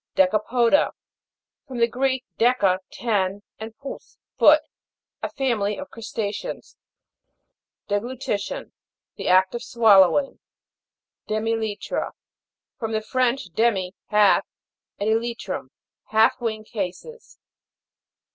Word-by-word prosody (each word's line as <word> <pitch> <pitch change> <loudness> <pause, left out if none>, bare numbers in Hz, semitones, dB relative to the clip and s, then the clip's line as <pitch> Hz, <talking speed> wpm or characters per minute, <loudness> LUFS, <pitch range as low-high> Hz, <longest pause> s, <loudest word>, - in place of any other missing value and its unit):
DECAFO'DA. 230 +8 +3 0.7
From 260 -2 -7
the 235 0 +4
Greek, 260 +2 -1
deca, 215 -6 +3
ten, 205 -3 -1 0.2
and 220 0 -8
pous, 275 +2 -9 0.2
foot. - - +6 0.6
A - - -2
family 225 -7 -1
of 285 0 -8
Crusta'ceans. 215 -2 -5 1.1
DEGLUTI'TION. 210 0 -3 0.5
The - - -5
act 185 +1 +4
of 240 - -4
swallow 205 -8 +5
ing. 275 - -7 0.9
DEMI 215 +1 -1
ELY'TRA. 220 -2 -2 0.7
From 225 -3 -3
the 215 0 -1
French, 255 -2 0
de'mij 195 -5 +1 0.2
half, 210 -1 +4 0.5
and 205 - -1
e'lytrum. 220 - -2 0.4
Half 220 +2 +3
wing 220 -2 -2
cases. 215 - -6
220 Hz, 100 wpm, -24 LUFS, 205-240 Hz, 1.1 s, foot